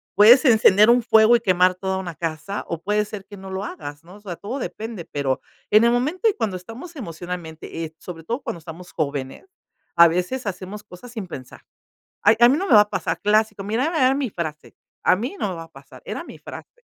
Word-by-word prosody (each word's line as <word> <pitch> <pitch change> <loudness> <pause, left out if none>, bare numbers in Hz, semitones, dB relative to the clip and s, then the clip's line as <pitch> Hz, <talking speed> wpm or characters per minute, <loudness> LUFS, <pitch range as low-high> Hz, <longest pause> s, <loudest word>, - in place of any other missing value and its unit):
Puedes 235 +8 +7
encender 215 -3 +6
un 240 0 +5
fuego 220 0 +6
y 235 - +1
quemar 185 -3 +3
toda 190 +1 -2
una 180 -3 -5
casa 165 +5 -4
o 170 -1 -4
puede 210 +2 +1
ser 205 -2 -8
que 205 - -12
no 190 0 -10
lo 190 +1 -4
hagas, 145 -5 -8
¿no? 180 +3 -14
O 205 - -15
sea, 185 -5 -7
todo 235 +7 -5
depende, 220 -6 -6
pero 135 -2 -2 0.3
en 215 +2 +6
el 235 - +4
momento 300 - +1
y - - 0
cuando 210 - -2
estamos 235 - -10
emocionalmente, 170 - -7
eh, 160 0 -11
sobre 165 -3 -9
todo 235 - -3
cuando 175 - -5
estamos 165 +2 -11
jóvenes 140 - -4 0.5
a 170 0 +9
veces 180 +10 -2
hacemos 200 +2 -6
cosas 210 +6 -12
sin 215 -6 -6
pensar. 130 -7 -10 0.6
"Ay 210 +2 +6
a 240 - +8
mí 275 - +3
no 380 - -2
me - - +3
va 210 - +9
a 210 - -1
pasar" - - -2
clásico, 210 -1 +1
mírame, 250 - -1
era 260 -2 +4
mi 275 -3 -1
frase, 155 -5 -6 0.3
a - - +5
mí 245 - -4
no 205 - -1
me 185 - -4
va 165 - -7
a 165 - -23
pasar, 135 -2 -15
era - - -5
mi - - -11
frase. 485 - -11
200 Hz, 225 wpm, -22 LUFS, 170-235 Hz, 0.6 s, a